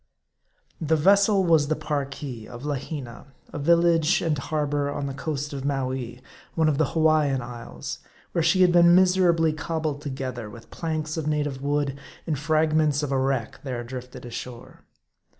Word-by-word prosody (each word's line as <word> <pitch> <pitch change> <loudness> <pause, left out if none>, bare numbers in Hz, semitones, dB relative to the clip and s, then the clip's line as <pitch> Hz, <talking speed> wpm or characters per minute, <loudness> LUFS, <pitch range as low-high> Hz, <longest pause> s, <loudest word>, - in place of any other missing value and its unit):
THE 160 0 +2
vessel 195 +4 +4
was 160 -4 +4
the 155 - +1
Parki, 140 -6 -4
of 120 +2 -10
Lahina, 140 -3 -5 0.3
a - - -4
village 170 +1 +3
and 160 -3 +1
har 150 +2 -2
bor 145 0 -1
on 145 0 -3
the 135 - -4
coast 145 +1 -4
of 135 -1 -5
Mowee, 130 -3 -3 0.3
one 160 -1 +3
of 145 -3 +1
the 155 - +1
Hawaian 155 -4 +3
isles, 120 -1 -7 0.3
where 170 - 0
she 175 +3 +4
had 180 - +5
been 175 0 +6
miserably 180 -4 +4
cobbled 155 -2 -3
together 130 -5 -5
with 115 +2 -13
planks 155 -1 -3
of 155 -2 -2
native 145 -3 -1
wood, 140 -1 -1 0.3
and 150 -5 -2
fragments 155 -1 +2
of 140 - -2
a 135 - +1
wreck, 130 -1 -1
there 125 -4 -4
drifted 125 +1 -8
ashore. 120 0 -8
145 Hz, 165 wpm, -25 LUFS, 135-160 Hz, 0.3 s, been